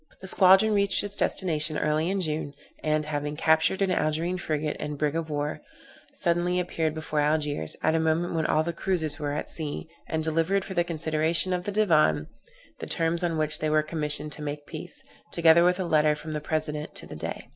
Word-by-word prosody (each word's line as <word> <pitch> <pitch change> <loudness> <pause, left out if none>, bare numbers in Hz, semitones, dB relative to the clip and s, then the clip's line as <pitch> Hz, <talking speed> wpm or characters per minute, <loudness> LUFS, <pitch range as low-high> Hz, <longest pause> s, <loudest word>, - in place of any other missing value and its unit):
The 190 - -9
squadron 190 +4 +5
reached 200 -1 +2
its 205 0 -4
destination 155 -4 +1
early 155 +2 0
in 195 0 -1
June, 155 -3 -3 0.3
and, 155 0 +1
having 145 0 -3
captured 160 +5 +3
an 190 - +1
Algerine 165 +2 0
frigate 155 -2 -2
and 150 -1 -4
brig 150 +1 0
of 165 -1 -2
war, 150 0 -3 0.5
suddenly 175 +1 0
appeared 160 -3 -1
before 155 -1 -2
Algiers, 150 - 0
at - - +3
a 165 - +2
moment 160 +2 0
when 160 -1 0
all 155 - +2
the 170 +1 -3
cruizers 165 -4 -1
were 145 -1 -2
at 150 - -3
sea, 155 -1 -5 0.2
and 160 0 -2
delivered, 165 +5 +1
for 190 - -6
the 175 -1 +2
consideration 160 +2 +1
of 180 0 -2
the 205 - -2
Divan, 155 - +3 0.5
the - - -6
terms 165 +1 0
on 165 -2 0
which 155 0 -1
they 155 - 0
were 155 0 +3
commissioned 150 -1 -3
to 150 - -8
make 145 0 -5
peace, - - -8 0.3
together 170 0 +5
with 180 +1 +3
a - - 0
letter 155 -2 +3
from 155 +1 -8
the 150 -1 -3
President 150 -1 -3
to - - -7
the - - -9
Dey. - - -6
160 Hz, 205 wpm, -26 LUFS, 150-175 Hz, 0.5 s, squadron